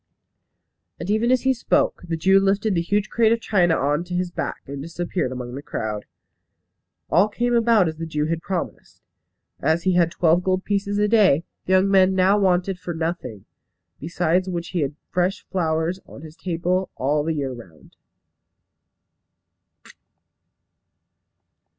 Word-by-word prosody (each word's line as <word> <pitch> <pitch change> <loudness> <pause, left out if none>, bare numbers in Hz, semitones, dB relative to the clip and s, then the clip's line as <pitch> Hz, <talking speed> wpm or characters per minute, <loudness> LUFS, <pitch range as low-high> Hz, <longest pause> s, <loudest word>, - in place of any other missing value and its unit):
And 175 +4 -3
even 220 +3 +1
as 255 0 +2
he 265 0 +3
spoke 245 - 0
the 165 -1 -2
Jew 190 +4 +4
lifted 195 +2 +1
the 170 - +1
huge 205 +4 0
crate 225 -2 +3
of 230 - +2
china 180 -7 +2
on 145 +4 0
to 180 0 -5
his 180 0 -1
back, - - -4
and 140 0 -7
disappeared 170 -2 -3
among 125 -1 -6
the 140 - -6
crowd. 110 -6 -4 1.1
All 190 +4 +5
came 240 +3 -1
about 230 -5 +4
as 160 -1 -4
the 165 0 -5
Jew 150 -1 -1
had 165 +1 -2
promised. 185 -2 -5 0.6
As 160 +2 +1
he 185 - +2
had 175 -2 +3
twelve 170 0 +2
gold 185 0 0
pieces 200 0 -1
a 210 0 +2
day, 200 -8 +4 0.2
the 185 - +2
young 190 +1 +4
man 190 -1 +4
now 190 +2 +4
wanted 185 -1 +1
for 175 -2 -5
nothing, 160 - -4 0.5
besides 175 +3 0
which 170 -2 -4
he 180 - -2
had 145 0 -2 0.2
fresh 180 +2 -1
flowers 165 0 0
on 140 - -12
his 155 0 -11
table 180 +2 -1
all 145 +3 0
the 160 +1 -1
year 135 -3 -2
round. 95 -10 -14
175 Hz, 160 wpm, -22 LUFS, 160-195 Hz, 1.1 s, All